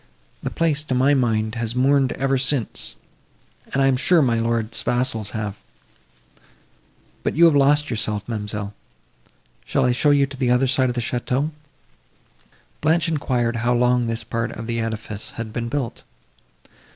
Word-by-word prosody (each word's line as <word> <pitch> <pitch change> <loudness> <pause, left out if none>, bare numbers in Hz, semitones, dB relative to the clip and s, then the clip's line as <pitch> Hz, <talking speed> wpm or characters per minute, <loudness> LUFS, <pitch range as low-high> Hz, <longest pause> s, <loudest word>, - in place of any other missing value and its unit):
The - - -3
place, 160 -3 +1
to 130 - -1
my 135 +3 +4
mind, 110 -5 +1
has 115 0 -2
mourned 135 +1 +3
ever 135 0 0
since, 130 -3 -1 0.8
and 135 - +1
I - - +4
am 135 -1 +3
sure 160 +5 +4
my 115 -3 +2
lord's 115 -1 0
vassals 120 -4 0
have! 105 -2 -5 1.6
But - - -2
you 170 +3 +6
have 165 -3 +5
lost 145 +1 +3
yourself, 105 -2 -1
ma'amselle,—shall 105 - -5
I 125 - +3
show 125 +4 +2
you 140 -1 +4
to 135 0 -10
the 130 -2 0
other 125 +2 +3
side 130 0 +2
of 120 - -3
the 120 - -1
château?" 125 +5 -1 1.3
Blanche 160 +2 +2
enquired 125 -6 0
how 120 +1 +1
long 125 0 +2
this 115 0 -3
part 115 +1 -3
of 115 - -7
the 115 0 -2
edifice 110 -2 -4
had 115 -2 -5
been 115 0 -3
built. 130 -3 -3
125 Hz, 160 wpm, -22 LUFS, 115-135 Hz, 1.6 s, you